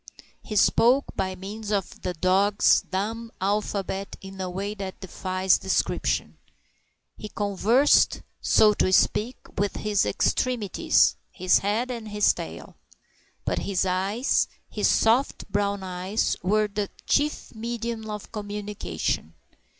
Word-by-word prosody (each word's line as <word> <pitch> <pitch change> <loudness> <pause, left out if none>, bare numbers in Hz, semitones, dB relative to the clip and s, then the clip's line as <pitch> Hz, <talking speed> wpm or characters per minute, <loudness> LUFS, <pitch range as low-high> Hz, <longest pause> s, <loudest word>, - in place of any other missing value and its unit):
He 215 - -7
spoke 245 +6 +4
by 190 -1 -2
means 205 +3 -7
of 200 -3 -2
the 180 - -3
dog's 195 +4 +3
dumb 225 +4 -4
alphabet 195 0 -2
in 190 0 -9
a 185 - -3
way 195 +3 -3
that 195 -2 -7
defies 185 0 0
description. 190 - -1 0.8
He 215 - -7
conversed, 210 +7 +3 0.2
so 215 -1 +5
to 185 - +1
speak, 225 +6 +2 0.2
with 205 0 0
his 210 -1 +1
extremities 240 -6 +2
his 185 0 +3
head 220 +6 -1
and 230 -3 -6
his 210 -1 +3
tail. - - -8 0.7
But - - 0
his 190 -1 0
eyes, 195 +7 +1 0.2
his - - +1
soft 235 +5 +2
brown 200 -1 0
eyes, 185 +3 -1
were 210 +4 +2
the 205 -1 -3 0.2
chief 295 +1 0
medium 230 -1 -4
of 210 -1 -7
communication. 210 -1 -4
205 Hz, 125 wpm, -25 LUFS, 190-220 Hz, 0.8 s, so